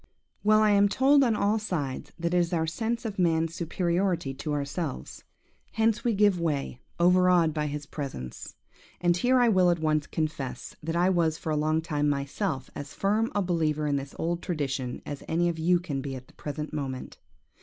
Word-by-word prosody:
Well! 215 +1 +5
I 210 - +4
am 200 0 +5
told 275 +5 +4
on 235 -4 +2
all 210 +2 +1
sides 155 -11 -3
that 170 0 -2
it - - +3
is 175 0 +1
our 160 -1 +1
sense 225 +9 -2
of 205 -3 -4
man's 165 -2 +2
superiority 170 -2 -1
to 150 +3 -5
ourselves. 145 +1 -4 0.5
Hence 225 +1 +1
we 235 -3 +1
give 205 -3 +4
way, 145 -6 -2 0.2
overawed 180 -2 +4
by 150 -1 -1
his 145 0 -5
presence. 135 - -7 0.4
And 175 -1 +3
here 250 +7 +3
I 245 - +5
will 185 -5 +4
at 175 - +2
once 155 -2 0
confess, 155 -5 -4
that 165 +2 -3
I 180 +2 +3
was 165 -3 +1
for 160 - -4
a - - +1
long 155 +1 +1
time 150 -3 0
myself 140 +1 -2
as 145 0 -8
firm 215 +4 +1
a 205 - +2
believer 155 -4 0
in 145 -1 +1
this 135 0 -6
old 170 +1 -1
tradition 135 -7 -3
as 145 -1 -6
any 175 +2 +1
of 165 -1 -4
you 175 +2 +3
can 145 -6 -4
be 135 -1 -5
at 130 0 -9
the - - -22
present 150 +1 -6
moment. 135 -4 -5
165 Hz, 195 wpm, -27 LUFS, 150-185 Hz, 0.5 s, Well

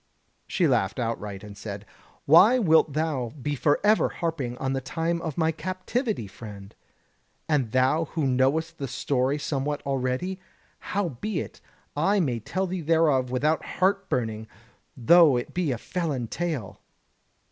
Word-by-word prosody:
She 175 -4 +1
laughed 115 -8 +1
outright, 105 -5 -4
and 105 -1 -10
said: 100 0 -7 0.4
"Why 185 - +7
wilt 160 - +4
thou 145 -6 -1
be 145 +3 -2
forever 155 +10 +3
harping 145 -8 -3
on 135 0 -2
the 135 - -1
time 165 +5 -2
of 160 -4 -5
my 160 -1 +2
captivity, 185 - -3
friend? 100 0 -10 0.7
And 135 -8 +1
thou 130 +6 +2
who 160 0 -2
knowest 140 +6 +1
the 135 - -3
story 135 +1 0
somewhat 145 0 -2
already? 135 +8 -2 0.4
Howbeit, 185 - -3 0.3
I 195 +8 +2
may 130 -9 0
tell 185 - -2
thee 185 -1 -3
thereof 155 -5 +2
without 150 +5 +1
heart 195 +1 0
burning, 110 -3 -2 0.5
though 150 +2 +6
it 120 - -5
be 175 -5 0
a 120 - -1
felon 145 -5 -3
tale." 160 - -4
145 Hz, 140 wpm, -26 LUFS, 125-170 Hz, 0.7 s, Why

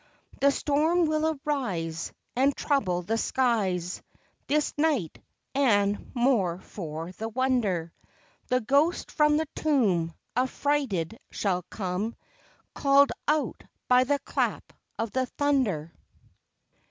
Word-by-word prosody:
The 280 - +5
storm 310 +5 +2
will 310 -1 0
arise, 175 - -2 0.2
And 270 +3 +3
trouble 185 - 0
the 225 +6 -1
skies 195 -10 0 0.5
This 300 +1 +1
night; 290 - 0 0.3
and, 205 -7 +2
more 235 -9 +2
for 165 -3 -6
the 220 +5 -5
wonder, 220 -9 0 0.5
The 255 0 +2
ghost 285 +9 +2
from 300 -1 +3
the 315 0 -1
tomb 205 - +2 0.2
Affrighted 250 - 0
shall 185 -3 -1
come, 195 +3 -3 0.6
Call'd 280 0 +4 0.2
out 300 +1 0 0.2
by 250 0 +6
the 285 +2 +1
clap - - -2 0.2
of 225 -1 -2
the 260 -1 0
thunder. 240 - 0
250 Hz, 110 wpm, -27 LUFS, 185-285 Hz, 0.6 s, by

